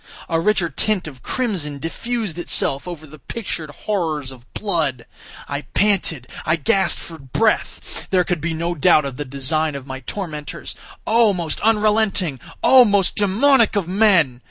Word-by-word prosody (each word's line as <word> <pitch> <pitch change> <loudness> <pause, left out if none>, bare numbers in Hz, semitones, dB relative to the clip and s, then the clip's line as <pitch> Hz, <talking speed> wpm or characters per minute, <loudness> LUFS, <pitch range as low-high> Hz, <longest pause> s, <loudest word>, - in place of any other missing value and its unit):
A 165 -1 +1
richer 190 -1 +2
tint 185 +4 -1
of 135 -4 -10
crimson 185 - -2
diffused 200 - -3
itself 140 -3 0
over 165 -3 -7
the 155 0 -14
pictured 165 - -5
horrors 155 -5 -2
of 125 -1 -15
blood. 155 - -1 0.4
I 140 0 -3
panted! 190 - +1 0.2
I 160 - +2
gasped 170 +4 +1
for 165 -1 -9
breath! 175 - -1
There 185 -2 +3
could 175 -4 -2
be 165 +1 -2
no 170 +2 -1
doubt 155 -1 +4
of 135 -2 -5
the 145 - -4
design 140 +3 -1
of 135 -2 -7
my 130 -1 -6
tormentors—oh! 195 - -2
most 165 -4 -2
unrelenting! 210 - +2 0.2
oh! 260 -1 +8
most 200 -5 +2
demoniac 225 +4 +3
of 195 -5 0
men! 185 - +3
170 Hz, 155 wpm, -20 LUFS, 145-205 Hz, 0.4 s, oh